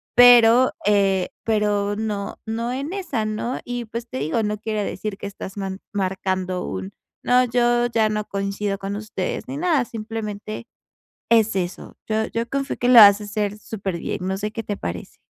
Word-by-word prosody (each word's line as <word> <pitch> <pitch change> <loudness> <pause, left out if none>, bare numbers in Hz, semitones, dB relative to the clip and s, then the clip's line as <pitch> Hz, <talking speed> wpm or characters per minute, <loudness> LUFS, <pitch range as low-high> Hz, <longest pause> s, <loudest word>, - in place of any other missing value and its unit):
Pero, 245 0 +7
eh, 195 -3 +3 0.2
pero 205 -2 +1
no 210 -2 -3
no 230 +2 -2
en 280 +5 -4
esa, 285 - -2
¿no? 215 +3 -3
Y, 245 -1 -4
pues, 230 +2 -6
te - - -5
digo, 160 +10 0
no 210 0 -1
quiere 215 -1 -2
decir 210 -1 -4
que - - -6
estás 195 0 -8
man 190 0 -4
marcando 185 -1 -1
un: 95 +1 -5 0.3
"No, 250 +1 +4
yo 240 0 +2
ya 225 -2 +2
no 210 0 -2
coincido 200 0 -2
con 200 +1 -4
ustedes". 215 +1 -4
Ni 275 - -4
nada, 320 -6 +2
simplemente 215 0 -6 0.6
es 225 -3 +4
eso. 180 -1 -4
Yo 220 0 0
yo 230 +1 -3
confío 275 0 -2
que 245 - 0
lo 250 - +6
vas 205 0 +9
a - - -6
hacer 205 0 -2
superbién. 195 -6 -4
No 190 0 -1
sé 210 +1 -3
qué 225 +1 -5
te 205 -1 -4
parece. 85 0 -6
215 Hz, 180 wpm, -22 LUFS, 200-235 Hz, 0.6 s, vas